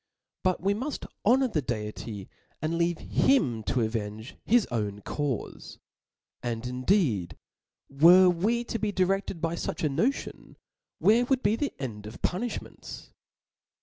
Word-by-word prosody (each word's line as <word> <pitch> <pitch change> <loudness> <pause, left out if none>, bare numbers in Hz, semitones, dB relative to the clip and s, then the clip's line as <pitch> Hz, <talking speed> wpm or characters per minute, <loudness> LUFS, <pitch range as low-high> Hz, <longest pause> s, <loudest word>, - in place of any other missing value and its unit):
But 185 -1 +1
we 195 +2 +2
muft 260 +8 -4 0.2
honor 260 +5 +4
the 165 -11 -1
Deity, 105 -4 -5 0.4
apd 160 +2 0
leave 170 0 +1
him 135 - +2
to 125 - +1
avenge 110 +1 -3
his 235 -1 +4
own 105 -3 -2
caufe. 140 0 -4 0.6
And 120 0 -3
indeed, 125 - +1 0.5
were 175 +7 +7
we 205 +7 +1
to 230 -1 -4
be 210 0 0
direfted 190 -2 0
by 165 -1 0
fuch 170 - -4
a 155 - +2
notion, 220 - -2 0.4
where 230 +4 +4
would 265 0 +1
be 205 +2 +3
the 285 +4 -2
end 105 -6 -6
of 110 - -11
punifhments 220 +7 -4
165 Hz, 140 wpm, -28 LUFS, -, 0.6 s, were